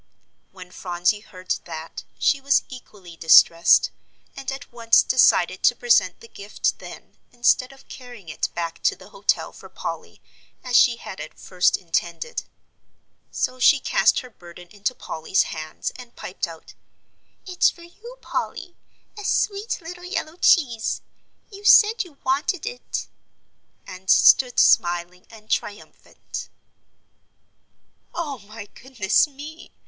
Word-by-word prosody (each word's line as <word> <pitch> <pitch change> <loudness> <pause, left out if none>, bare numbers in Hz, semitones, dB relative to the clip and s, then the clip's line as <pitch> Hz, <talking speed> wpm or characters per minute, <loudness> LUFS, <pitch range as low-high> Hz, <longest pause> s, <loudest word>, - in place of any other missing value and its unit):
When 185 -1 -13
Phronsie 180 +3 -1
heard 185 -3 -10
that, 160 +1 -8
she 280 - +1
was 275 +1 +3
equally 205 -9 -12
distressed, 165 +1 +5 0.4
and 270 0 -5
at 270 -2 -9
once 230 -1 +4
decided 185 -8 +3
to 245 - +4
present 225 -7 +2
the 230 - -13
gift 205 -1 -3
then - - -12
instead 250 +1 +2
of 270 - -18
carrying 245 -8 -12
it 155 - -3
back 170 -1 -4
to - - +2
the - - -16
hotel - - -1
for - - -14
Polly - - -7 0.4
as 250 -1 -2
she 240 -1 +6
had 190 - -9
at 155 +1 -9
first 180 -1 +1
intended. 170 -1 -3 0.9
So 255 - -3
she 275 +3 +5
cast - - +2
her 255 -2 -13
burden 175 -2 -14
into 205 +6 -3
Polly's 160 +4 -1
hands 155 0 -6
and 245 -2 -13
piped 185 0 -5
out, 165 -1 -13 0.7
"It's 365 -2 +2
for 345 - -13
you, 455 +8 -13
Polly, 350 - -5 0.4
a 415 - -9
sweet 405 +2 -1
little 355 +2 -9
yellow 345 -2 -4
cheese; 245 -12 +2 0.5
you 400 0 -12
said 435 +2 +6
you 325 -6 -17
wanted 280 +8 -1
it," - - -5 0.8
and 185 +1 -11
stood 250 -2 +5
smiling 175 +2 +2
and 215 -2 -16
triumphant. 205 0 -5 1.7
"Oh, 295 -6 -4
my 215 +1 -11
goodness 235 +1 0
me!" 295 +3 -11
235 Hz, 135 wpm, -23 LUFS, 180-280 Hz, 1.7 s, she